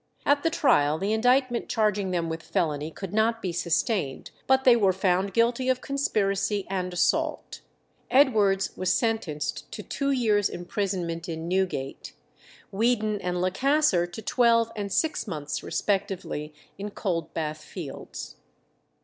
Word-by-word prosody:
At 285 0 +3
the 330 - +2
trial 155 - +3
the 200 +5 -1
indictment 245 +2 +2
charging 210 -3 +1
them 175 -2 -1
with 160 0 -4
felony 155 -5 -1
could 190 +3 -8
not 225 +2 +2
be 185 -5 -3
sustained, 170 - -1 0.2
but 265 0 +4
they 250 -2 +7
were 200 -5 +3
found 190 +1 +1
guilty 235 +3 +2
of 255 -1 +2
conspiracy 200 -7 0
and 180 -1 -2
assault. 175 - 0 0.5
Edwards 210 -8 +3
was 185 0 0
sentenced 220 - -1
to - - -6
two 280 -1 -2
years' 220 -7 +2
imprisonment 175 -2 -3
in 160 0 -4
Newgate, 180 -7 -2 0.6
Weedon 215 -1 +1
and 180 -1 -2
Lecasser 205 - +2
to 175 +5 -8
twelve 230 0 +3
and 205 -2 -4
six 315 -1 0
months 150 -5 -4
respectively 190 -6 -2 0.3
in 205 +1 -4
Coldbath 165 -6 -3
Fields. 155 -5 -8
195 Hz, 135 wpm, -26 LUFS, 175-230 Hz, 0.6 s, they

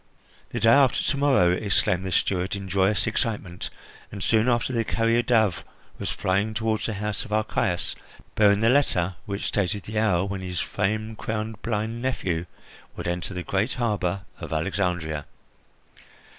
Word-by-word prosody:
"The - - -3
day 115 - +4
after 135 0 +5
to 140 - 0
morrow!" 135 -11 +4
exclaimed 95 -1 +1
the - - -3
steward 90 +2 +1
in 100 -1 -6
joyous 95 +2 +2
excitement; 105 -5 -2 0.4
and 100 -2 -5
soon 115 +2 +3
after 120 +1 +1
the 115 -1 +1
carrier 115 +1 +2
dove 110 -6 +2 0.4
was - - -3
flying 100 +4 0
toward 110 0 0
the 110 -1 -2
house 105 +3 -2
of 120 - -11
Archias, 105 -4 0 0.4
bearing 105 -1 +4
the 115 - +4
letter 95 -10 +2
which 100 0 -3
stated 100 0 -1
the 110 0 -2
hour 95 -4 +2
when 100 -1 -4
his 90 -1 -3
fame 110 +2 -1
crowned 110 -1 -4
blind 115 +1 -2
nephew 90 -10 -1 0.5
would - - -5
enter 90 +2 -3
the 90 - -3
great 100 +8 0
harbour 100 -6 -1 0.2
of - - -7
Alexandria. 80 -3 -1
105 Hz, 160 wpm, -25 LUFS, 95-110 Hz, 0.5 s, after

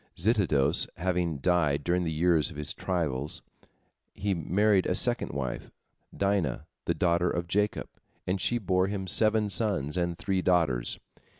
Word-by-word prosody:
Zitidos 85 - +2
having 90 -3 -1
died 75 -1 +1
during 90 +2 0
the 80 - -2
years 80 -2 +3
of - - -11
his 75 -1 -3
trials, 75 -6 -3 0.7
he 100 0 -1
married 95 +4 +1
a - - 0
second - - +3
wife, 65 -3 -5 0.5
Dinah, 100 -9 0 0.2
the - - 0
daughter 85 0 +1
of 85 0 -3
Jacob, 105 +3 -1 0.4
and 95 +1 -2
she 120 - +2
bore 95 -3 +1
him 100 -1 -4
seven 110 +3 +3
sons 90 -6 0
and 85 -1 -1
three 95 -1 -1
daughters. 80 -10 +1
90 Hz, 145 wpm, -28 LUFS, 75-95 Hz, 0.7 s, years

